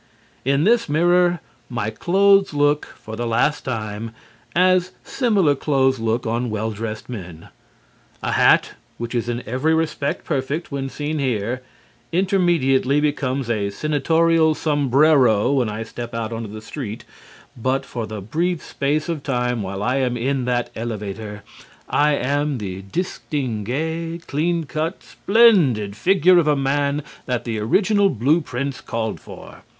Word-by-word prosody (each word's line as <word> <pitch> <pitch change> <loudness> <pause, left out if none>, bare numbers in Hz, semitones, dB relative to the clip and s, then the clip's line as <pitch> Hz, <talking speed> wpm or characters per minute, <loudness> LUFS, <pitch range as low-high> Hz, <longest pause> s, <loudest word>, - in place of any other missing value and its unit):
In 140 +3 +2
this 230 -1 +3
mirror, 175 +2 +3 0.3
my 115 -3 -2
clothes 195 - +3
look 145 +1 +2
(for 110 - -9
the 120 +1 -3
last 120 +6 +1
time) 110 -2 -4 0.4
as 185 0 +3
similar 205 - +2
clothes 135 -2 +1
look 115 +2 -1
on 115 +2 -1
well 110 +1 -2
dressed 110 0 -5
men. 90 -9 -8 0.7
A - - -1
hat - - +4 0.3
which 120 +1 -5
is 120 -1 -1
in 120 +1 -3
every 130 +7 +1
respect 155 -3 -2
perfect 145 +3 -2
when 135 -1 -3
seen 150 +2 -3
here, 125 -2 -1 0.5
immediately 170 -7 +2
becomes 140 -3 -1
a 105 -4 0
senatorial 160 +6 +2
sombrero 140 -6 +3
when 130 -5 +1
I 105 +1 -4
step 120 +1 -7
out 115 0 -3
into 115 -2 -5
the 110 +1 -9
street, 110 -3 -6 0.5
but 130 +3 -1
for 115 -3 -5
the 110 -2 -6
brief 165 - -1
space 150 +3 -1
of 165 -4 -3
time 125 -4 -1
while 95 +1 -4
I 125 +4 +1
am 125 -2 0
in 130 +1 -1
that 120 -1 -1
elevator, 105 -2 -5 0.4
I 150 +1 +3
am 145 +2 0
the 95 -3 -5
distingué, 155 - -3
clean 165 +4 0
cut, 155 +4 -3
splendid 170 - +3
figure 180 - +4
of 160 - +1
a 150 - +4
man 140 +1 0 0.2
that 125 -3 -1
the 115 -2 -3
original 200 - +3
blue 140 - +2
prints 140 -1 -4
called 110 -1 -3
for. - - -12
135 Hz, 145 wpm, -21 LUFS, 115-160 Hz, 0.7 s, hat